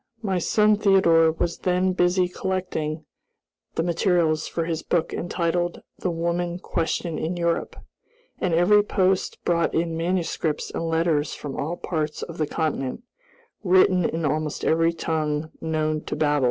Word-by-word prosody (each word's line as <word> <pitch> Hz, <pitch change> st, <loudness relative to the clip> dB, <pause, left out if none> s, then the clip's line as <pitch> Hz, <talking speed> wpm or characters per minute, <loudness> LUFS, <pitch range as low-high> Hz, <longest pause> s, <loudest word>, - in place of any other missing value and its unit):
My 190 Hz, -3 st, 0 dB
son 210 Hz, +4 st, +3 dB
Theodore 170 Hz, -6 st, +5 dB
was 170 Hz, +1 st, -2 dB
then 185 Hz, +1 st, +1 dB
busy 180 Hz, 0 st, +2 dB
collecting 180 Hz, -4 st, -3 dB, 0.7 s
the 165 Hz, -, +1 dB
materials 170 Hz, -2 st, +1 dB
for 165 Hz, -, -2 dB
his 165 Hz, -1 st, -2 dB
book 165 Hz, -1 st, -1 dB
entitled 175 Hz, 0 st, -1 dB, 0.2 s
"The 185 Hz, -, -1 dB
Woman 170 Hz, +1 st, -1 dB
Question 170 Hz, -2 st, -2 dB
in 175 Hz, +2 st, -2 dB
Europe," 170 Hz, -1 st, -1 dB, 0.6 s
and 185 Hz, -, 0 dB
every 175 Hz, +5 st, +5 dB
post 190 Hz, -2 st, 0 dB
brought 170 Hz, -1 st, +1 dB
in 165 Hz, 0 st, 0 dB
manuscripts 165 Hz, -2 st, -1 dB
and 165 Hz, -, -3 dB
letters 160 Hz, -3 st, +1 dB
from 145 Hz, -2 st, -6 dB
all 165 Hz, +5 st, -3 dB
parts 155 Hz, -3 st, -3 dB
of 170 Hz, -1 st, -8 dB
the 155 Hz, -, +1 dB
continent, 155 Hz, -, -2 dB, 0.6 s
written 185 Hz, -1 st, +4 dB
in 165 Hz, 0 st, -1 dB
almost 150 Hz, +1 st, -1 dB
every 165 Hz, +1 st, +3 dB
tongue 155 Hz, -2 st, -2 dB
known 155 Hz, -1 st, -1 dB
to -, -, -3 dB
Babel. 150 Hz, -1 st, +2 dB
170 Hz, 145 wpm, -24 LUFS, 160-180 Hz, 0.7 s, Theodore